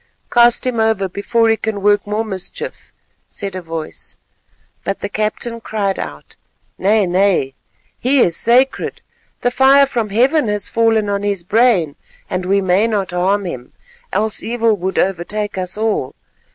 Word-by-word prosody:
"Cast 240 0 +4
him 250 -3 -1
over 220 -3 +1
before 225 +5 0
he 225 - +4
can 215 -2 -4
work 205 0 +3
more 215 +2 -1
mischief," 190 -4 -6 0.4
said 195 -2 -6
a 185 - -4
voice. 165 -2 -7 0.7
But 195 - -3
the 200 - -3
captain 215 +3 -2
cried 200 -3 -2
out, 75 -2 -8 0.4
"Nay, 205 +2 +3
nay, 180 -6 +1 0.5
he 265 +3 +2
is 170 -8 +3
sacred; 255 +3 +1 0.4
the 245 - +1
fire 270 +2 +5
from 235 -5 -2
Heaven 255 +6 +2
has 210 -1 -1
fallen 225 -2 +2
on 200 0 -1
his 200 -3 -2
brain, 195 - +2 0.4
and 180 0 -2
we 200 +1 +2
may 190 +4 +2
not 200 -5 -1
harm 190 +3 +1
him, 125 -8 -7 0.4
else 220 0 -1
evil 230 -1 +1
would 190 +1 -3
overtake 195 +3 -1
us 185 +1 -4
all. 215 -11 -1
205 Hz, 155 wpm, -17 LUFS, 190-230 Hz, 0.7 s, fire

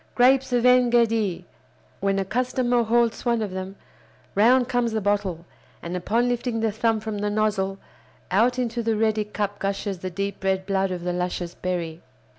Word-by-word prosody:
Grapes 260 +2 +4
of 245 0 +2
En 250 -1 +5
Gedi!" 225 -6 +1 0.5
When 195 0 0
a 195 - 0
customer 245 +2 +1
halts 235 0 +1
one 235 -2 +1
of 205 - -4
them, 190 +1 -5 0.6
round 240 +5 +4
comes 245 -3 0
the 220 - +1
bottle, 200 -4 -1 0.4
and, 170 +1 -4
upon 225 +7 +1
lifting 245 -1 -1
the 225 -1 +1
thumb 225 +1 +1
from 215 -1 -4
the 205 0 -1
nozzle, 205 -2 0 0.5
out 235 +6 +3
into 240 -1 -1
the 225 -1 0
ready 220 -1 +1
cup 205 -1 -4
gushes 195 -1 -2
the 185 - -4
deep 195 +2 -4
red 190 0 0
blood 195 -1 0
of 180 -1 -4
the 180 0 -1
luscious 180 -1 -3
berry. 170 -3 -4
210 Hz, 180 wpm, -24 LUFS, 190-235 Hz, 0.6 s, En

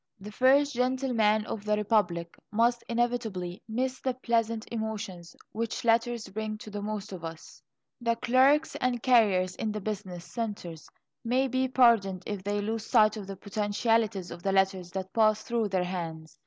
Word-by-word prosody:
The 205 +2 -9
First 275 +5 +4
Gentleman 245 -4 +1
of 210 - -5
the 210 0 +1
Republic 190 -6 0
must 235 +2 +2
inevitably 230 -7 -1
miss 255 +3 -1
the 260 -1 -1
pleasant 230 -3 0
emotions 205 -7 -5 0.2
which 230 +1 -3
letters 230 0 +2
bring 215 +2 -4
to 215 - -10
the 205 0 -4
most 210 0 -4
of 175 -3 -8
us. 165 -1 -9 0.4
The 235 -1 +1
clerks 265 +6 +3
and 250 -2 -1
carriers 200 -8 +4
in 220 - -2
the 210 - -3
business 190 -4 -5
centres 200 -9 -5 0.3
may 255 +3 +2
be 260 +1 0
pardoned 230 -8 +3
if 205 -3 -4
they 205 +1 -1
lose 220 +1 -3
sight 215 -3 +5
of 205 -3 -7
the 195 - -6
potentialities 205 -1 0
of 170 - -8
the 195 - 0
letters 190 -2 +1
that 190 0 -5
pass 215 -1 +3
through 235 -2 0
their 185 -2 +1
hands. 165 -3 -6
215 Hz, 170 wpm, -28 LUFS, 190-235 Hz, 0.4 s, sight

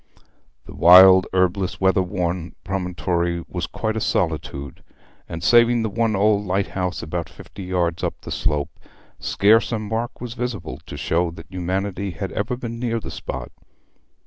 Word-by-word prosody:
The - - -11
wild, 95 +2 +8
herbless, 95 0 0
weather 95 0 +3
worn 90 -2 -3
promontory 85 -2 -2
was 90 -1 -4
quite 110 -1 -3
a 110 - -2
solitude, 75 -7 -2 0.5
and, 80 - -6
saving 120 0 +5
the 110 - -2
one 115 0 +1
old 105 +1 +3
lighthouse 95 -1 -2
about 85 +1 -4
fifty 100 - -11
yards 85 -2 -1
up - - -2
the - - -8
slope, 75 -1 -2 0.4
scarce 110 +4 +3
a 115 - 0
mark 110 +3 -4
was 120 -1 -6
visible 120 -9 -5
to - - -7
show 85 +1 0
that 80 +2 -12
humanity 95 +2 -2
had 90 +2 -5
ever 115 +5 -2
been 115 -2 -6
near 115 -1 -1
the - - -8
spot. 65 -2 -6
95 Hz, 155 wpm, -22 LUFS, 85-110 Hz, 0.5 s, wild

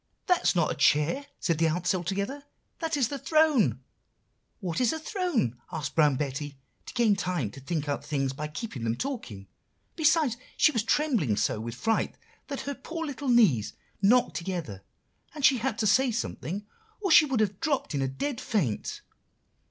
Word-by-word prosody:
"'That 360 -2 +3
is - - +2
not 170 -3 +2
a - - 0
chair,' 165 - +2
said 165 -4 0
the 165 - +4
ants 175 +3 0
all 180 -2 -2
together, 200 - -3 0.4
'that 325 -2 -1
is 255 -5 +2
the 280 - -4
throne.' 310 -3 +3 0.8
"'What's 195 +5 0
a 320 - -2
throne?' 315 - -1
asked 150 -2 -4
Brown 150 -4 +4
Betty, 145 +1 -4 0.3
to - - -8
gain 230 -4 +4
time 175 - -2
to - - -11
think 150 +2 -3
out 145 0 -2
things 140 -3 -1
by 150 +3 -4
keeping 150 - -6
them 115 0 0
talking. 125 - -5 0.5
Besides, 310 -6 +3 0.2
she - - +5
was 230 -6 +1
trembling 225 - +1
so - - 0
with 115 +1 -5
fright, 225 - 0 0.3
that 280 -2 -4
her 285 - -4
poor 325 +5 -6
little 285 -2 -4
knees 195 - +4 0.3
knocked 240 +5 +4
together, 170 - -4 0.5
and 295 -3 +1
she 260 -3 +5
had 230 -2 -1
to 225 - 0
say 250 +6 +4
something 205 -3 -4 0.3
or 390 -4 -1
she 305 - +8
would 265 -5 -1
have 205 -3 0
dropped 290 - -1
in 140 - 0
a 135 - +1
dead 235 - -3
faint. 150 - -2
205 Hz, 185 wpm, -28 LUFS, -, 0.8 s, she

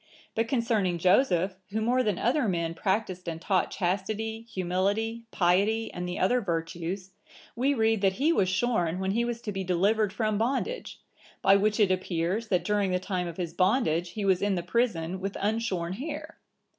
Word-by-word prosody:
But 225 +1 0
concerning 225 -8 +1
Joseph, 185 0 +3
who 215 +2 -2
more 245 +3 +2
than 210 -7 0
other 250 +1 +1
men 170 -3 -1
practised 190 -1 -1
and 165 -1 -5
taught 185 +1 +1
chastity, 215 +5 -2
humility, 200 +6 -1
piety, 200 +5 +1
and 180 0 -4
the 180 - -4
other 245 +7 +2
virtues, 170 +1 -3 0.4
we 270 +4 +2
read 220 -3 +2
that 195 -1 +3
he 290 - +2
was 190 - +2
shorn 185 -4 +1
when 190 0 -1
he 235 +4 +1
was 235 -1 -3
to 210 - -3
be 195 -1 -3
delivered 195 +4 +2
from 215 0 -1
bondage,(980) 270 - -4
by 195 - +6
which 210 +2 +2
it 200 -3 +4
appears, 185 +4 -1
that 180 -4 +1
during 205 -1 +1
the 180 - +1
time 185 -1 -2
of 170 - -7
his 175 -3 -3
bondage, 185 -4 +2
he 210 -2 -3
was 190 -2 +3
in 200 -1 +1
the 175 - -2
prison 185 -4 0
with 195 +1 -4
unshorn 200 -5 -1
hair. 300 +7 -6
195 Hz, 180 wpm, -28 LUFS, 180-225 Hz, 0.4 s, by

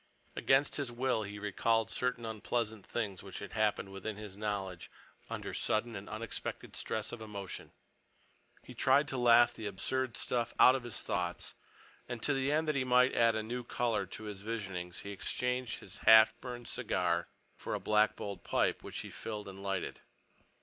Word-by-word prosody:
Against 135 +2 +3
his 140 -4 -2
will 125 -1 +1
he 105 0 -6
recalled 110 +3 +1
certain 125 -2 -1
unpleasant 110 -1 -2
things 100 -6 -2
which 95 -1 -8
had - - -7
happened 105 -2 +1
within 95 +2 -5
his 105 -2 -8
knowledge 100 -4 -3 0.4
under - - -4
sudden 115 +1 0
and 100 0 -7
unexpected 110 +1 -5
stress 110 -1 -2
of 120 - -7
emotion. 100 -3 -6 0.9
He - - -10
tried 140 +3 +4
to 135 - -2
laugh 120 0 +6
the 110 -2 -5
absurd 125 +5 -2
stuff 120 -1 -1
out 130 - +9
of 135 - -1
his 120 - -3
thoughts - - -2 0.6
and 120 -2 -3
to 145 - +3
the 135 +1 +1
end 155 +1 +2
that 155 - +1
he 135 - +2
might 125 0 +5
add 115 -1 +4
a 110 - -1
new 120 +3 -4
color 115 -5 0
to 110 - -8
his 105 -2 -6
visionings 95 -5 -4
he 100 - -6
exchanged 125 +3 -2
his 95 - -10
half 110 0 +8
burned 120 -2 -6
cigar 90 -9 0 0.3
for - - -4
a - - -2
black 105 0 +3
bowled 100 -1 -6
pipe, - - +1
which - - -5
he - - -8
filled 105 -2 -5
and 95 0 -9
lighted. 100 -1 -3
110 Hz, 180 wpm, -33 LUFS, 100-120 Hz, 0.9 s, out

